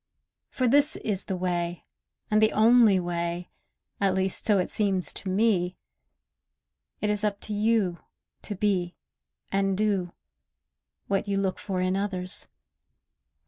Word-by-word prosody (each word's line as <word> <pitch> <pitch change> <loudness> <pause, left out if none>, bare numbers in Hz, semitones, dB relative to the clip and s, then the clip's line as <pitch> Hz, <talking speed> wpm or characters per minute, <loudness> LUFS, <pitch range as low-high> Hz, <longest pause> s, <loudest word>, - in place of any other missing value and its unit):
For 255 - 0
this 290 +4 +5
is 200 -3 -3
the 190 - -3
way, 175 -1 -2 0.5
and 215 0 +4
the 220 - +4
only 220 -3 +5
way— 175 0 -3 0.5
At 195 -2 +2
least 190 0 -1
so 210 -2 +4
it 180 - -1
seems 195 -4 0
to 195 - -3
me. 185 -3 +1 1.2
It 210 - +1
is 210 0 -2
up 205 -1 0
to 210 - -5
you, 210 -4 +1 0.4
to 205 - -6
be, 185 -3 0 0.6
and 195 -1 +1
do, 195 -4 0 0.9
What 200 +1 -1
you 200 -1 0
look 195 -1 -1
for 185 -3 -3
in 185 +1 +1
others. 190 -2 -1
195 Hz, 140 wpm, -27 LUFS, 180-210 Hz, 1.2 s, this